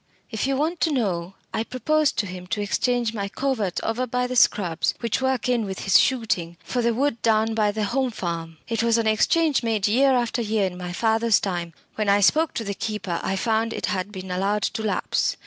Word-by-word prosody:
If 220 +3 -1
you 275 - +1
want 315 +5 -1
to 320 - +2
know, 195 -8 -1 0.2
I 220 - 0
proposed 295 +6 0
to 210 - +1
him 185 -1 -8
to 210 - -2
exchange 240 +2 0
my 200 -3 -3
coverts 220 -5 -1
over 240 +3 -1
by 250 +1 0
the 250 0 -4
Scrubs, 175 -8 +2
which 235 +1 -1
work 260 -3 0
in 245 -2 +1
with 190 -2 -5
his 195 - +5
shooting, 200 -10 0
for 250 - -2
the 235 0 +2
wood 265 -2 0
down 225 0 +2
by 215 -2 +2
the 215 +1 -2
Home 255 +5 0
Farm. 170 -6 -5
It 230 -1 -1
was 230 0 +3
an 230 - 0
exchange 280 +7 +2
made 220 -4 0
year 265 +5 +4
after 240 0 0
year 215 -2 +1
in 185 -1 -4
my 180 0 -6
father's 225 +3 +2
time. 175 -4 -3 0.2
When 215 -2 -1
I 200 +1 +5
spoke 315 - +3
to 230 - -2
the 200 -2 -3
keeper, 200 -4 -3
I 190 - -1
found 225 +2 0
it - - -2
had 190 +2 -3
been 190 -2 -7
allowed 200 +3 0
to 220 - -1
lapse. 215 -2 0
220 Hz, 220 wpm, -24 LUFS, 195-245 Hz, 0.2 s, his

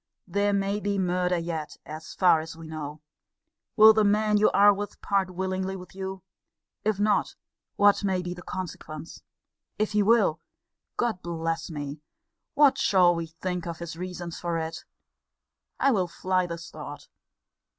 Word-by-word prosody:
There 200 +2 +1
may 200 +1 0
be 205 -1 -1
murder 180 -1 +1
yet, 165 -2 -4
as 155 +1 -8
far 180 -4 +5
as 160 +1 -7
we 165 - -10
know. 155 -1 -6 0.7
Will 220 0 +9
the 215 0 +3
man 210 +1 +3
you 215 - +5
are 205 +1 +6
with 205 0 -6
part 195 -2 0
willingly 190 +1 -2
with 180 -1 -10
you? 190 -1 -6 0.6
If 210 -1 0
not, 210 0 +1 0.4
what 205 0 +4
may 190 -2 0
be 175 0 -4
the 180 - -10
consequence? 165 -4 -7 0.6
If 215 0 0
he 210 0 +3
will 205 -6 +3 0.6
Lord 230 -6 0
bless 165 -1 -3
me! 145 -1 -6 0.5
what 280 -2 +5
shall 180 -3 +5
we 165 -1 -3
think 175 +2 -4
of 170 -1 -4
his 170 -1 -6
reasons 180 -1 -6
for 170 -1 -2
it? 160 0 -5 0.9
I 275 - +4
will 190 -7 +1
fly 185 +1 0
this 170 0 -7
thought. - - -9
185 Hz, 160 wpm, -27 LUFS, 165-205 Hz, 0.9 s, Will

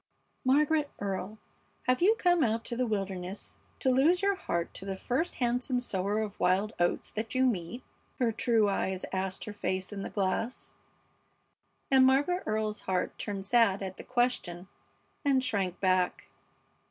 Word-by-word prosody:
"Margaret 295 +3 +3
Earle, 200 +1 -3 0.5
have 255 +3 +1
you 420 +5 +5
come 350 -5 +3
out 230 -1 0
to 235 - -3
the 250 +1 0
wilderness 195 -2 -4 0.2
to 260 - +2
lose 320 +9 +4
your 400 0 +4
heart 170 - -3
to - - -7
the 195 0 -3
first 265 - -1
handsome 250 +1 0
sower 205 -2 -1
of 210 -2 -5
wild 195 +4 +2
oats 175 0 0
that 220 +3 -4
you 260 0 +4
meet?" 230 +1 -2 0.3
her 240 -3 +2
true 225 -1 +2
eyes 190 -1 -1
asked 190 0 -2
her 210 - -6
face 190 -1 -2
in 200 - -5
the - - -4
glass, 205 +5 -2 1.2
and 265 -1 +7
Margaret 285 +8 +3
Earle's 215 -1 -1
heart 185 -1 -1
turned 195 -2 -4
sad 205 -3 +3
at 190 0 -6
the - - -8
question 240 -8 -1 0.6
and 270 -3 +3
shrank 195 -8 -1
back. 185 -1 +1
220 Hz, 160 wpm, -30 LUFS, 190-255 Hz, 1.2 s, and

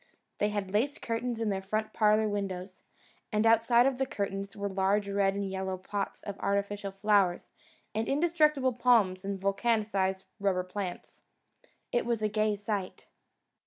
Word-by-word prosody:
They 210 - +2
had 205 -2 -3
lace 265 +9 +1
curtains 230 0 -3
in 225 -2 0
their 195 -1 -1
front 215 +3 -2
parlour 215 0 +3
windows, 195 -2 -4 0.5
and 215 0 +1
outside 230 +2 +5
of 265 -1 +1
the 265 - +1
curtains 195 -3 -4
were 200 0 -2
large 195 +1 +1
red 200 -1 +1
and 200 0 -2
yellow 190 0 -3
pots 200 +2 -4
of 200 -1 -6
artificial 200 0 -1
flowers 195 -2 +2 0.4
and 220 +1 -1
indestructible 300 -3 +2
palms 225 -6 +3
and 195 0 -3
vulcanised 195 -1 0
rubber 195 -2 +1
plants. 185 0 -6 0.7
It 240 - 0
was 230 -2 0
a - - +3
gay 215 0 +1
sight. 205 -2 -4
205 Hz, 155 wpm, -30 LUFS, 195-225 Hz, 0.7 s, outside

